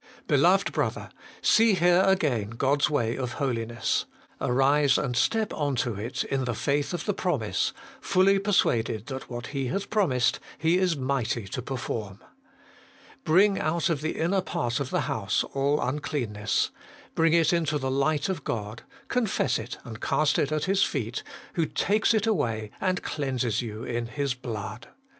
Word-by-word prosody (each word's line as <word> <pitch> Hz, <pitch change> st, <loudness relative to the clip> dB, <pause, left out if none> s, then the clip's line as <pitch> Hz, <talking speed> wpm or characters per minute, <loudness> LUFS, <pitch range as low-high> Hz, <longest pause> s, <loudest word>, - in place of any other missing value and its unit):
Beloved -, -, +3 dB
brother! -, -, -2 dB, 0.3 s
see 225 Hz, -2 st, +5 dB
here 175 Hz, +1 st, +4 dB
again 140 Hz, -, +1 dB
God's 135 Hz, +6 st, +1 dB
way 120 Hz, -6 st, 0 dB
of 125 Hz, -2 st, -3 dB
holiness. 120 Hz, -4 st, -1 dB, 0.4 s
Arise 135 Hz, +2 st, +3 dB
and 130 Hz, -4 st, -1 dB
step 220 Hz, -, +1 dB
on 145 Hz, -3 st, -1 dB
to 120 Hz, -1 st, 0 dB
it 110 Hz, +6 st, -3 dB
in 135 Hz, -1 st, -1 dB
the 120 Hz, -2 st, -2 dB
faith 140 Hz, +5 st, 0 dB
of 175 Hz, -2 st, -3 dB
fehe 205 Hz, -, -1 dB
promise, 120 Hz, -, 0 dB, 0.3 s
fully 195 Hz, +1 st, +3 dB
persuaded 115 Hz, -, +1 dB
that 135 Hz, -1 st, -7 dB
what 120 Hz, -1 st, -5 dB
He 135 Hz, -2 st, -1 dB
hath 195 Hz, +10 st, -3 dB
promised 145 Hz, -, +2 dB, 0.2 s
He 165 Hz, +3 st, +2 dB
is 185 Hz, -3 st, +2 dB
mighty 130 Hz, -5 st, -1 dB
to 125 Hz, -, -4 dB
perform. 115 Hz, -6 st, -4 dB, 1.1 s
Bring 195 Hz, +5 st, +4 dB
out 165 Hz, +3 st, 0 dB
of 150 Hz, -4 st, -1 dB
the 155 Hz, -, -2 dB
inner 185 Hz, +4 st, +1 dB
part 140 Hz, -9 st, -2 dB
of 140 Hz, -2 st, -3 dB
the -, -, 0 dB
house 100 Hz, -2 st, 0 dB
all 140 Hz, +2 st, +1 dB
uncleanness; 125 Hz, -7 st, -1 dB, 0.4 s
bring 165 Hz, 0 st, +3 dB
it 170 Hz, 0 st, +4 dB
into 160 Hz, -3 st, +1 dB
the 130 Hz, -2 st, -2 dB
light 145 Hz, +5 st, +1 dB
of 185 Hz, -7 st, -3 dB
God; 110 Hz, -2 st, -4 dB, 0.3 s
confess 215 Hz, -, +1 dB
it 115 Hz, +3 st, -6 dB
and 110 Hz, -2 st, -9 dB
cast 155 Hz, -1 st, +2 dB
it 145 Hz, -, 0 dB
at 155 Hz, -1 st, 0 dB
His 195 Hz, 0 st, +2 dB
feet, 125 Hz, -, -1 dB, 0.3 s
who 165 Hz, -3 st, 0 dB
takes 215 Hz, +3 st, +2 dB
it 215 Hz, -1 st, +1 dB
away, 115 Hz, -, -1 dB
and 185 Hz, -1 st, 0 dB
cleanses 130 Hz, -6 st, -1 dB
you 110 Hz, -1 st, -6 dB
in 120 Hz, -1 st, -3 dB
His 140 Hz, +1 st, -2 dB
blood. 110 Hz, -3 st, -6 dB
140 Hz, 165 wpm, -27 LUFS, 120-170 Hz, 1.1 s, see